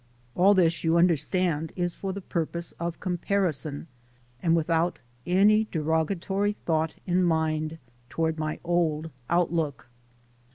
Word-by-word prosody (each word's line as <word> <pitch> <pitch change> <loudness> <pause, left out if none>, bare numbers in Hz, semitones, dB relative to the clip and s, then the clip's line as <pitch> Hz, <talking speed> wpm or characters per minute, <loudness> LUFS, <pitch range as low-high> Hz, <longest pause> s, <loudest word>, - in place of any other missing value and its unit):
All 195 +8 +5
this, 170 -3 +2
you 165 0 +3
understand, 170 -1 +1
is 175 -1 -1
for 195 - -4
the 200 +1 -6
purpose 170 -1 -3
of 170 0 -3
com 180 -2 -2
parison 165 -7 -1 0.6
and 165 -1 +3
without 165 +1 +1 0.3
any 210 +4 +4
derogatory 170 +6 0
thought 160 -1 0
in 180 0 +2
mind 160 -1 0 0.3
toward 160 -1 -1
my 155 0 -2
old 165 -2 0 0.2
outlook. 165 -7 0
170 Hz, 125 wpm, -27 LUFS, 160-180 Hz, 0.6 s, All